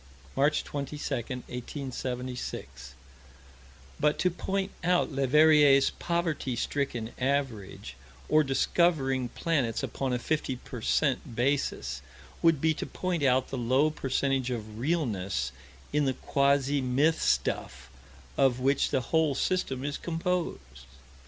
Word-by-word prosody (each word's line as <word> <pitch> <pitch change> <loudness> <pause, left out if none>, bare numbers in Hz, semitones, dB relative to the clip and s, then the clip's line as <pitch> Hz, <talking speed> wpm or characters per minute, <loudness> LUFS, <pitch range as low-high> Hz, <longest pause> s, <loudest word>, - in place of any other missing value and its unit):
March 145 +3 +2
22, 145 +1 -5 0.2
1876 125 - -5 1.0
But 150 0 +2
to 180 - +2
point 195 +3 -2
out 175 -1 +2
Leverrier's 140 0 +5
poverty 170 -7 -2
stricken 120 -2 -2
average 125 - -2 0.3
or 155 0 +4
discovering 135 -2 +1
planets 135 -9 -1
upon 135 -1 -2
a 125 - +1
fifty 140 +1 -1
per 125 -1 -9
cent. 130 -1 0
basis 120 - -1 0.4
would 165 -3 +4
be 160 +2 +2
to - - -5
point 180 -3 -2
out 130 -2 +2
the 135 - -3
low 130 +6 +3
percentage 135 -2 0
of 110 -3 -5
realness 100 - -1 0.4
in 150 0 +2
the 135 - +1
quasi 140 +1 +1
myth 140 +6 +2
stuff 70 0 -1 0.5
of 130 -2 +3
which 135 +2 +2
the 130 - +1
whole 155 +2 +1
system 135 -5 -1
is 145 0 -3
composed. 165 - -3
135 Hz, 120 wpm, -29 LUFS, 125-155 Hz, 1.0 s, Leverrier's